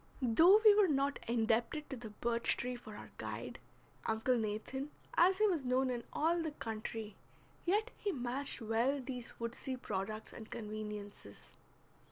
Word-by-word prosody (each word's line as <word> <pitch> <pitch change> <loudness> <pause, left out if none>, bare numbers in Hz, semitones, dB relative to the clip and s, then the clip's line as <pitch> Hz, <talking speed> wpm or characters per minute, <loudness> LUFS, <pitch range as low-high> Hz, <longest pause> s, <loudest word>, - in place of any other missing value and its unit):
Though 330 - +7
we 425 - +10
were 410 -1 +5
not 280 -2 +1
indebted 235 +5 +1
to - - -2
the 235 -3 -7
birch 235 +2 +1
tree 250 +1 -2
for 220 -3 -10
our - - -9
guide, - - -5 0.5
Uncle 225 +3 +2
Nathan, 225 +5 -2 0.2
as 370 +2 +5
he 430 - +4
was 345 -9 +2
known 255 +1 +2
in 240 -1 -3
all 335 +2 +2
the 320 - -1
country, 220 -4 -5 0.5
yet 425 +7 +2
he 410 - 0
matched 260 -2 -2
well 230 +6 +1
these 250 -2 -6
woodsy 240 +3 -3
products 215 -1 -4
and 220 -2 -9
conveniences. 210 - -7
240 Hz, 155 wpm, -35 LUFS, 220-285 Hz, 0.5 s, we